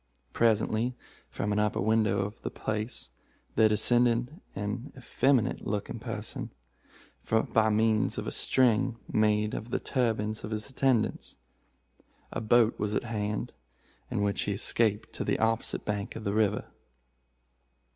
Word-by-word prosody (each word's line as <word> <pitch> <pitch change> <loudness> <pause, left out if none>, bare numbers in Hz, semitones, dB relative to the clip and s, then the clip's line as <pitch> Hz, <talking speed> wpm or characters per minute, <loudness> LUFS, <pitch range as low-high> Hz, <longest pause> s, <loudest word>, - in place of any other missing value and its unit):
Presently, 115 +2 +2 0.3
from 105 - -2
an 105 - +1
upper 105 0 +1
window 110 -1 +2
of 100 +3 -5
this - - -5
place, 110 - -3 0.4
there 110 -1 +5
descended 120 - +2
an 105 +7 -4
effeminate 130 -1 +1
looking 105 -1 -3
person, - - -5 0.8
by 110 0 +3
means 110 0 +2
of - - -3
a - - -3
string 120 -2 +2
made 105 0 +2
of 110 - -5
the - - 0
turbans 110 -4 -1
of 105 - -5
his 110 -1 -3
attendants. 130 -4 0 0.9
A - - -3
boat 115 +1 +3
was 105 0 -1
at - - 0
hand, 105 -2 -3 0.6
in 100 - -1
which 100 -1 0
he 100 - -1
escaped 110 +1 0
to - - -3
the - - 0
opposite 115 0 0
bank 100 -1 -3
of 115 - -6
the 100 - -1
river. 105 -1 +1
110 Hz, 140 wpm, -29 LUFS, 105-115 Hz, 0.9 s, there